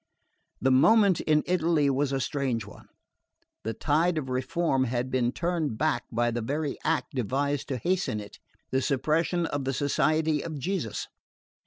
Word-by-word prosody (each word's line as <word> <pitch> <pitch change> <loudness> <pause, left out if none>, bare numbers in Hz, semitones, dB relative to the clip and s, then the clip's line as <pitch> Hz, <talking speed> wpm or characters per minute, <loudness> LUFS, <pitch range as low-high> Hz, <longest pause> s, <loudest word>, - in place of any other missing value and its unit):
The 130 - +2
moment 200 - +5
in 150 -1 +2
Italy 165 -4 +2
was 140 0 +1
a 135 - 0
strange 130 -5 -1
one. 105 - -14 0.8
The 110 0 -3
tide 160 +6 +1
of 135 -4 -3
reform 130 +2 0
had 125 +1 -2
been 125 -2 +1
turned 165 -7 -2
back 155 +2 0
by 120 0 +1
the 120 +1 -2
very 145 +5 -2
act 160 0 0
devised 135 +3 -1
to 135 -3 -2
hasten 175 - 0
it: 105 -1 -10 0.3
the 130 - +1
suppression 155 +6 +1
of 145 -3 -2
the 135 +1 -1
Society 150 +3 +1
of 160 -2 -5
Jesus. 160 - -3
145 Hz, 160 wpm, -27 LUFS, 130-160 Hz, 0.8 s, moment